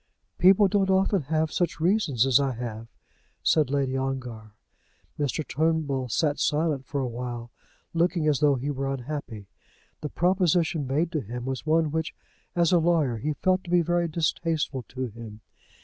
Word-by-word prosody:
"People 195 +2 +6
don't 195 0 +1
often 190 0 +3
have 160 0 +1
such 175 -3 -1
reasons 165 - +2
as 135 0 +4
I 135 -2 0
have," 115 -1 -6 0.6
said 155 -5 +3
Lady 135 -1 0
Ongar. 125 -5 -4 0.6
Mr. 145 +2 -1
Turnbull 150 -4 0
sat 145 +5 0
silent 150 -3 0
for 140 0 -2
a 130 - -1
while, 120 0 -6 0.4
looking 170 -1 +1
as 150 -3 +2
though 145 -2 +4
he 135 +3 -2
were 135 0 -2
unhappy. 130 -5 -5 0.6
The 150 - -4
proposition 175 -5 +1
made 155 +6 0
to 155 - -1
him 120 +3 -6
was 130 +3 -4
one 160 -1 +2
which, 160 +1 -2 0.4
as 170 -2 +3
a 175 - +5
lawyer, 160 -8 +2
he 150 +8 -2
felt 185 +4 +1
to - - -9
be 175 -1 +4
very 175 +1 +1
distasteful 160 -3 -1
to 130 0 -4
him. 110 -2 -10
150 Hz, 165 wpm, -26 LUFS, 130-165 Hz, 0.6 s, People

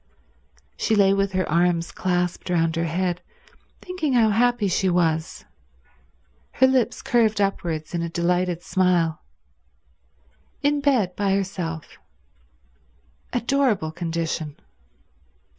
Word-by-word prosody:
She 220 - +1
lay 195 -1 +5
with 195 0 0
her 185 -1 0
arms 170 +1 +1
clasped 180 -1 -2
round 165 -2 +1
her 165 +1 0
head 175 +2 -1 0.6
thinking 360 -6 -2
how 230 -3 +4
happy 240 0 +2
she 190 +1 +1
was, 165 -3 0 1.1
her 260 - +4
lips 260 -3 +1
curved 220 -3 +2
upwards 170 -6 -2
in 170 - -1
a 170 - -2
delighted 175 +1 0
smile. 175 -4 +1 1.4
In 290 0 +2
bed 240 -11 +1
by 195 -1 +1
herself: 180 -5 -4 1.3
adorable 240 - +1
condition. 165 -2 -3
180 Hz, 110 wpm, -23 LUFS, 170-215 Hz, 1.4 s, lay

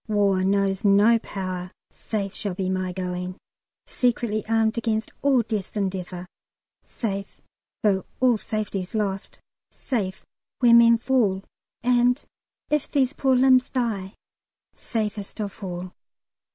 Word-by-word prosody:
War 200 -3 +2
knows 195 +1 +1
no 210 +3 +5
power. 185 -4 -5 0.2
Safe 200 -3 -4
shall 200 -4 -3
be 190 -1 -1
my 185 -1 -1
going, 180 0 -4 0.5
Secretly 235 -4 0
armed 225 0 +2
against 220 -1 -1
all 270 -4 +4
death's 210 -2 -4
endeavour. 185 -2 -3 0.6
Safe 200 -4 -5 0.4
though 195 -3 +2
all 250 -4 +4
safety's 205 -3 -4
lost; 195 -2 -2 0.3
safe 205 -6 -3 0.3
where 240 -2 +5
men 235 0 +7
fall; 225 -6 +1 0.4
And 245 +2 +3 0.5
if 300 -2 +1
these 270 -2 +2
poor 265 -3 +2
limbs 255 0 +5
die, 215 -7 -2 0.6
safest 210 -2 -4
of 205 0 -5
all." 180 -1 -5
210 Hz, 120 wpm, -24 LUFS, 190-235 Hz, 0.6 s, men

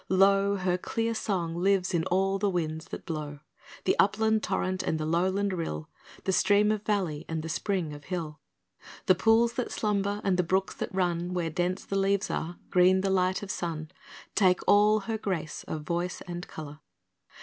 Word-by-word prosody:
Lo, 195 +1 +4
Her 180 -2 0
clear 230 +4 -1
song 180 -7 -2
lives 190 +1 +1
in 165 -1 +1
all 195 +2 +1
the 205 0 +1
winds 160 -3 -2
that - - -8
blow; 150 -4 -5 0.4
The - - +2
upland 220 +2 +3
torrent 185 -1 -1
and 160 -3 -1
the 155 - -2
lowland 190 +5 +1
rill, 80 - -4 0.3
The 190 - 0
stream 205 +2 +4
of 215 -1 -1
valley 185 -8 -1
and 160 -1 -2
the 165 - -5
spring 180 -3 -1
of 145 0 -11
hill, 165 -5 -4 0.7
The 185 - +6
pools 225 +5 +3
that 250 - -3
slumber 205 -1 0
and 190 -2 +2
the - - +4
brooks 190 +3 0
that - - -4
run 180 -1 -1
Where 170 -2 -1
dense 180 +3 -1
the 195 - -1
leaves 195 +1 +1
are, 175 +2 -3
green 185 +1 +5
the 195 0 0
light 185 +2 +1
of 200 - -4
sun, 160 -3 -4 0.4
Take 185 -3 +3
all 210 +1 +5
her 220 +2 -3
grace 175 -7 -3
of 155 -1 -4
voice 175 +2 -2
and 175 0 -6
colour. 150 -1 -8
185 Hz, 185 wpm, -28 LUFS, 170-200 Hz, 0.7 s, The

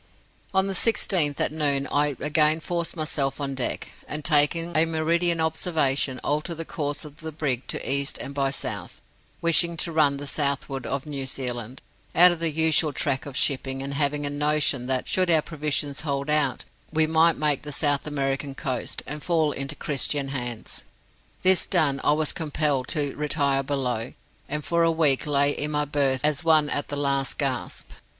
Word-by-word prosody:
"On 190 0 +2
the 195 - -2
16th, 180 -7 +2
at - - +1
noon, 145 -3 0
I 145 -1 +1
again 155 +1 +3
forced 170 +1 -3
myself 145 -3 -1
on 140 -1 -3
deck, 130 -2 -3 0.2
and 150 +1 -5
taking 165 +2 +2
a 155 +1 +4
meridian 165 +1 +1
observation, 155 -5 0
altered 155 +4 -1
the 165 +1 -5
course 145 -1 -3
of 150 0 -12
the 160 -1 -6
brig 140 -5 -2
to - - -3
east 140 +1 0
and 140 - -6
by 140 -1 0
south, 135 - -5 0.4
wishing 170 0 +3
to 170 - -1
run 155 -3 +3
to - - -5
the 145 - -6
southward 140 -2 -2
of 140 0 -3
New 140 -3 -4
Zealand, 125 -2 -4 0.3
out 180 +2 +8
of 175 - -4
the 165 -1 +1
usual 160 0 +2
track 140 0 -2
of 140 -1 -6
shipping; 135 -2 0
and 140 0 -4
having 145 0 0
a 145 - -2
notion 145 -3 +1
that, 130 -1 0
should 185 -1 +1
our 160 -2 +4
provisions 150 -2 -2
hold 140 -1 -2
out, 145 -5 +1 0.3
we 160 0 +3
might 160 +1 +3
make 150 -2 +1
the 150 - -7
South 145 0 +1
American 140 -1 -2
coast, 130 -2 -3
and 150 +2 -5
fall 160 -3 +1
into 140 +2 -3
Christian 140 -1 +1
hands. 120 -4 -5 0.6
This 185 0 +6
done, 150 -6 +1
I 145 - +4
was 155 0 0
compelled 150 -4 -1
to 145 -3 -1
retire 145 -2 +1
below, 130 -4 -2 0.4
and 150 +1 -3
for 170 0 +1
a 165 - +4
week 155 -3 +2
lay 145 0 +3
in 150 +1 -3
my 150 0 0
berth 140 -2 0
as 150 +2 +1
one 155 -3 +3
at 145 - -1
the 145 - -4
last 140 -1 0
gasp. 135 -4 -3
145 Hz, 185 wpm, -25 LUFS, 140-160 Hz, 0.6 s, out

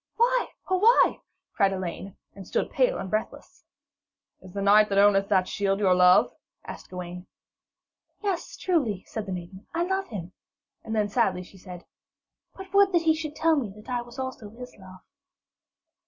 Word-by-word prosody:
'Why, - - +2 0.2
oh 375 -1 +1
why?' 460 +5 +4 0.3
cried 195 -2 +2
Elaine, 190 +1 -6 0.2
and 195 -2 -11
stood - - -1
pale - - +2
and - - -5
breathless. 215 +3 -5 0.8
'Is 185 - -13
the 200 +2 -4
knight 210 +1 +5
that 195 - 0
owneth 200 -1 +4
that 190 -3 +2
shield 195 -1 0
your 190 -3 +4
love?' 180 0 +5 0.3
asked - - -9
Gawaine. 180 0 -8 1.0
'Yes, 390 -4 -3
truly,' 270 - 0
said 215 -2 -6
the - - -4
maiden, 185 +2 -8
'I 340 - +1
love 385 +2 -1
him'; 185 -5 -7 0.5
and 225 0 -4
then 210 -1 +1
sadly 200 -4 0
she 190 +1 -16
said, 180 -2 -11 0.7
'but 385 0 -11
would 400 -1 +5
that 340 -1 +3
he 320 -1 +4
should 310 -1 -5
tell 325 0 +3
me 260 -8 -2
that 210 +3 -14
I 245 -1 -1
was 240 +2 -13
also 260 -5 -6
his 250 +3 -11
love.' 185 -1 -14
210 Hz, 175 wpm, -26 LUFS, 190-315 Hz, 1.0 s, knight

